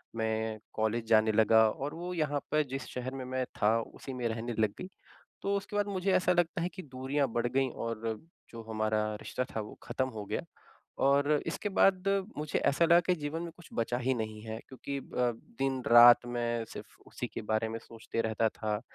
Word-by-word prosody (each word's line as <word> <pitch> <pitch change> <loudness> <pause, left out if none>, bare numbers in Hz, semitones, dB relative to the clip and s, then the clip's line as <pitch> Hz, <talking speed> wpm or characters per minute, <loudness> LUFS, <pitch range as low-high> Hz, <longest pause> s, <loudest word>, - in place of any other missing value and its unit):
मैं 110 -1 -1
कॉलेज 110 +1 0
जाने 110 -1 +5
लगा 110 +1 +5
और 140 +6 -4
वो 175 +2 -5
यहाँ 150 -4 0
पर 155 0 +3
जिस 135 -1 -4
शहर 130 +1 -4
में 130 -1 -5
मैं 130 0 -1 0.2
था 110 +2 +4
उसी 135 +3 -9
में 125 -2 -1
रहने 115 +1 -3
लग 110 -2 +2
गई। 185 - -6 0.5
तो 200 0 0
उसके 200 +1 -6
बाद 205 0 +1
मुझे 195 -1 0
ऐसा 180 0 +3
लगता 175 -1 +1
है 175 - 0
कि 185 - -7
दूरियाँ 135 0 -1
बढ़ 120 0 +1
गईं 130 +2 +1
और 115 -1 -3 0.3
जो 115 -1 -9
हमारा 110 -1 +1 0.2
रिश्ता 125 - -2
था 110 - 0
वो 105 - -9
ख़त्म 130 +2 -1
हो 110 -3 -6
गया। - - -2 0.7
और 140 +1 +4 0.2
इसके 205 - -2
बाद 195 -1 +3 0.3
मुझे 150 0 -1
ऐसा 155 +4 +3
लगा 170 +1 +7
कि 180 +1 +1
जीवन 155 +1 -4
में 170 - -5
कुछ 175 - -15
बचा 115 +1 0
ही 130 +1 +1
नहीं 110 -2 -4
है 110 0 -5
क्योंकि 140 +1 -5
अ, - - -7 0.6
दिन-रात 120 -3 +7
मैं 120 -1 -1
सिर्फ़ - - -10
उसी - - -5
के - - -6
बारे 110 +1 0
में 115 +1 -4
सोचते 115 0 -5
रहता 110 0 +1
था। 105 -1 -3
125 Hz, 205 wpm, -31 LUFS, 110-150 Hz, 0.7 s, लगा